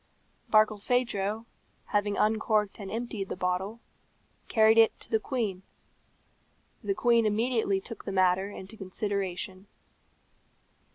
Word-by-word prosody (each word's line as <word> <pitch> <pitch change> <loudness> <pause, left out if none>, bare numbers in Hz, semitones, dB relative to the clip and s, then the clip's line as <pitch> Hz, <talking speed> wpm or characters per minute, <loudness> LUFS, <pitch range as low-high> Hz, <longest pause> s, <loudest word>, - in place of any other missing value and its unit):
Barkilphedro, 215 0 +2 0.4
having 205 -1 0
uncorked 215 -1 +1
and 195 -2 -6
emptied 220 -2 -4
the - - -3
bottle, 180 +5 -2 0.7
carried 220 0 +5
it 225 - +4
to - - -9
the 220 - +3
queen. 215 -7 -2 1.2
The 395 - 0
queen 235 - +3
immediately 220 -2 +1
took 225 +2 -10
the - - -3
matter 190 +1 +2
into 200 +1 -9
consideration. 195 -1 -4
210 Hz, 110 wpm, -29 LUFS, 195-225 Hz, 1.2 s, carried